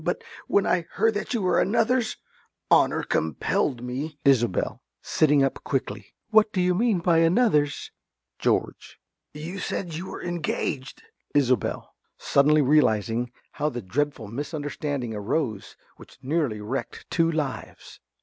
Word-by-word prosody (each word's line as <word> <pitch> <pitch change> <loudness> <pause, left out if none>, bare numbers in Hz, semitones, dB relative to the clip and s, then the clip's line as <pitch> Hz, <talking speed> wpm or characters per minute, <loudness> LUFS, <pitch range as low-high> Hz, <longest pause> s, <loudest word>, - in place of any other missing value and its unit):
But - - -2 0.2
when 200 - +3
I 170 -2 +1
heard 225 0 +2
that 210 +4 -3
you 220 - -1
were 180 -2 +3
another's, 230 +3 +1 0.5
honour - - +4
compelled 80 - -1
me 140 +5 -4
~Isobel~ 120 -8 +2 0.2
(sitting 145 -2 +3
up 135 - -1
quickly). 135 - -3 0.2
What 220 -1 +5
do 190 - -2
you 180 0 +3
mean 210 -1 +1
by 165 -1 +3
another's? 165 - +2 0.5
~George.~ - - -1 0.3
You 165 +6 -7
said 175 -2 -3
you 170 +4 -5
were - - -7
engaged! 160 -6 -3 0.3
~Isobel~ 130 -6 +1 0.2
(suddenly 150 +2 +3
realising 120 -4 +2 0.2
how 150 +1 -1
the 120 -5 -6
dreadful 140 +3 -2
misunderstanding 145 -1 -4
arose 110 +1 -3 0.2
which - - -15
nearly 135 -7 -1
wrecked 125 +6 -5
two 165 -1 +3
lives). 150 -4 -5
150 Hz, 130 wpm, -25 LUFS, 125-175 Hz, 0.5 s, What